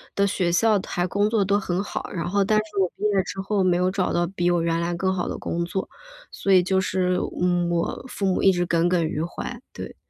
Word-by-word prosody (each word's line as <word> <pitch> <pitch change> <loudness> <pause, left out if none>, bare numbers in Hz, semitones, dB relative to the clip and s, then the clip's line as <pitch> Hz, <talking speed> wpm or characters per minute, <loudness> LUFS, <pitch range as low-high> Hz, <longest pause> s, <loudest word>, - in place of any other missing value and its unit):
的 200 0 +3
学 180 -3 0
校 210 +3 +3
还 175 -1 -1
工 205 +3 +1
作 215 -3 +2
都 200 +1 +2
很 185 0 -2
好， - - -5
然 175 0 -3
后 200 +1 +2
但 215 +2 +2
是 210 -1 -7
我 185 - +3
毕 210 - -10
业 200 -3 +2
之 190 - -7
后 195 0 0
没 180 -1 +3
有 180 +1 +2
找 185 -1 -1
到 175 0 +1
比 175 -1 0
我 175 -1 +2
原 165 0 0
来 170 +1 -1
更 190 +2 0
好 180 - -2
的 - - -4
工 170 0 -2
作。 190 +2 -4 0.4
所 195 - -2
以 185 - +7
就 190 +1 +1
是， 185 -1 0 0.2
嗯， 175 -1 +2
我 170 +8 -2
父 205 - -4
母 185 - 0
一 195 - +7
直 175 -1 0
耿 170 0 +2
耿 175 -2 +2
于 155 0 -2
怀， 170 - -6
对。 - - -8
185 Hz, 275 characters per minute, -24 LUFS, 175-195 Hz, 0.4 s, 以